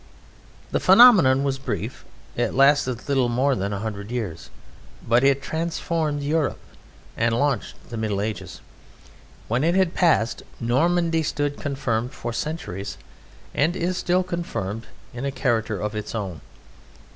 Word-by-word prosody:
The - - +1
phenomenon 185 - +7
was 135 -1 -1
brief. 115 -3 -4 0.3
It - - -1
lasted 135 -3 +3
little 135 -3 +2
more 130 +4 +2
than 100 -4 -2
a 100 - -2
hundred 105 -2 -5
years, 110 -10 -4 0.6
but 120 +3 +4
it 140 0 +3
transformed 160 -2 -2
Europe 150 0 0 0.6
and 115 0 +1
launched 140 -1 0 0.2
the 115 - -4
Middle 105 -3 -1
Ages. 105 +1 -4 0.9
When 120 +5 0
it 170 +3 +2
had 190 -3 +2
passed, 155 -10 +2 0.2
Normandy 165 +7 +2
stood 145 -1 -2
confirmed 130 -4 -2
for 120 0 -5
centuries 100 - -4 0.6
(and 160 +5 +1
is 180 +1 -1
still 180 +1 +1
confirmed) 170 - -4 0.3
in 120 +1 -6
a 140 - 0
character 110 -6 0
of 105 0 -3
its 105 +2 -5
own. 95 -8 -4
130 Hz, 140 wpm, -24 LUFS, 110-160 Hz, 0.9 s, phenomenon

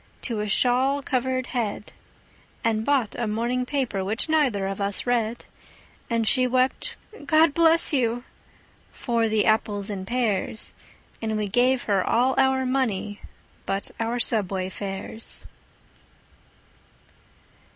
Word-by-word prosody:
to 230 -4 -2
a 210 0 -2
shawl 260 +6 +2
covered 255 -1 -1
head, 215 -4 -3 0.7
And 220 -1 +1
bought 260 -4 +1
a 235 - -1
morning 240 +4 -1
paper, 255 -9 -1
which 215 +9 0
neither 275 -11 +2
of 195 +1 -4
us 200 0 +1
read; 235 -1 -1 0.6
And 230 -2 0
she 255 +4 +3
wept, 255 +1 0 0.3
"God 315 -1 +5
bless 330 0 +4
you!" 245 -3 +1 0.7
for 230 -2 0
the 215 -1 +2
apples 210 -2 +1
and 190 -2 -5
pears, 225 -3 -1 0.5
And 220 -1 -1
we 210 -1 -1
gave 245 +5 +2
her 195 -3 +1
all 250 +3 +2
our 265 0 +3
money 225 -6 -1 0.5
but 195 +1 -1
our 230 +2 -1
subway 195 -6 +1
fares. 195 +3 -5
230 Hz, 125 wpm, -25 LUFS, 210-255 Hz, 0.7 s, God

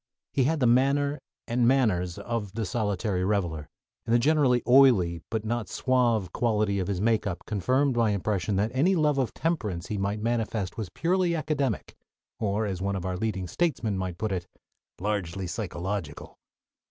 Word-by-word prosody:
He 130 - +2
had 160 +3 +1
the 130 - +2
manner 140 +4 +3 0.3
and 120 0 +2
manners 100 -10 +2
of 115 -5 -4
the 110 0 -2
solitary 100 -2 -1
reveler, 85 -7 -1 0.3
and 115 - +1
the - - +7
generally 130 -2 +3
"oily," 120 -11 +5
but 110 -1 -2
not 115 -1 -2
suave, 120 -6 +1
quality 105 -4 +1
of 90 - -2
his 100 -3 -1
makeup 105 -3 0
confirmed 130 +6 +1
my 115 -2 +3
impression 100 0 -1
that 105 +4 +1
any 165 +9 +3
love 150 -4 +2
of 130 - 0
temperance 105 - -2
he 105 - -2
might 100 +2 -1
manifest 110 -4 -1
was 110 -6 -4
purely 175 - +1
academic, 150 -3 -2 0.4
or, 105 +1 0
as 95 -3 -3
one 100 +1 -1
of 95 -2 -4
our 90 -1 -2
leading 95 -1 -2
statesmen 115 - -1
might 95 -2 -3
put 110 +1 -2
it, 90 -2 -3 0.5
"largely 95 -2 -2
psychological." 90 -3 -5
110 Hz, 165 wpm, -27 LUFS, 95-125 Hz, 0.5 s, the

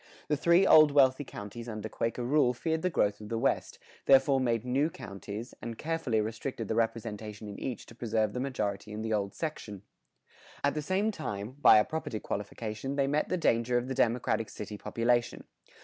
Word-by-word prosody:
[112:5] - - -25 0.2
The 150 - +2
three 170 +6 +4
old 155 -4 +7
wealthy 135 0 +4
counties 115 -1 -8
under 110 -1 -5
Quaker 115 +2 -2
rule 125 -1 +3
feared 160 +4 -1
the 185 - +1
growth 105 - 0
of 105 - -9
the 115 - -1
West, 130 +4 0 0.3
therefore 135 0 +5
made 115 -3 0
few 125 - -5
new 140 +5 +2
counties, 105 -1 -8
and 115 -1 -6
carefully 160 -8 -1
restricted 115 +1 -3
the - - -1
representation 110 -2 -3
in 100 - -8
each 125 -4 -5
to - - -14
preserve 110 -2 -1
the - - -3
majority 105 -6 -3
in 110 +1 -4
the 110 0 -1
old 100 -2 -1
section. 105 - -5 0.8
At 140 - +2
the 150 - -2
same 190 +7 0
time, 105 - -5
by 110 - +8
a 105 - +4
property 155 -8 -4
qualification 110 +6 -4
they 140 -1 +2
met 145 +2 0
the 185 - 0
danger 120 -6 +2
of 120 +1 -2
the 135 - -2
democratic 115 -2 +1
city 105 0 -7
population. 120 +3 0
120 Hz, 195 wpm, -30 LUFS, 110-140 Hz, 0.8 s, by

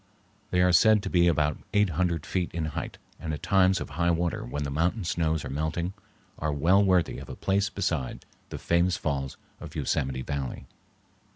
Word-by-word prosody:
They 90 - +2
are 90 0 +4
said 105 +4 +5
to 95 - -4
be 85 -1 +4
about 75 -2 +1 0.2
eight 105 -3 +4
hundred 85 -1 0
feet 90 -2 -2
in 80 -2 -1
height - - -5 0.2
and, 80 - -4
at 75 - -11
times 95 +1 +4
of - - -6
high 85 +4 +1
water 85 0 0
when 70 +4 -4
the 70 - -3
mountain 85 +9 0
snows 80 -3 0
are - - -5
melting, 80 +5 -2 0.5
are 75 0 -1
well 85 +8 +4
worthy 95 -3 +2
of - - -10
a - - -6
place 100 +2 0
beside 85 - -2 0.2
the - - -6
famous 85 +1 +1
falls 70 -3 -3 0.2
of - - -10
Yosemite 65 0 -1
Valley. 70 -2 -4
85 Hz, 190 wpm, -27 LUFS, 75-90 Hz, 0.5 s, said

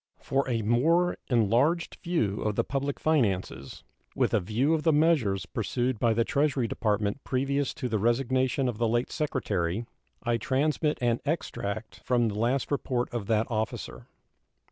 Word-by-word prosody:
For 135 0 -1
a 115 -3 0
more 165 +11 +3
enlarged 125 - +2
view 140 - 0
of 105 -1 -1
the - - +2
public 140 0 -3
finances, 95 - -1 0.3
with - - +1
a - - +4
view 115 - +1
of 160 - +1
the 160 - +3
measures 145 - +2
pursued 120 +4 -2
by 115 -2 +2
the 115 - +3
Treasury 140 -2 +1
Department 105 +2 -1
previous 140 +1 0
to 135 -5 -3
the 110 -3 -1
resignation 130 +3 +1
of 120 -3 -3
the 120 - +2
late 120 +2 0
Secretary, 105 - -1 0.4
I 120 -1 +1
transmit 150 +5 0
an 120 -1 +2
extract 110 -8 -4
from 120 -2 +2
the 105 0 -4
last 125 +5 0
report 125 -4 -1
of 115 -5 -3
that 110 -1 +2
officer. 110 -1 -4
120 Hz, 160 wpm, -28 LUFS, 110-140 Hz, 0.4 s, a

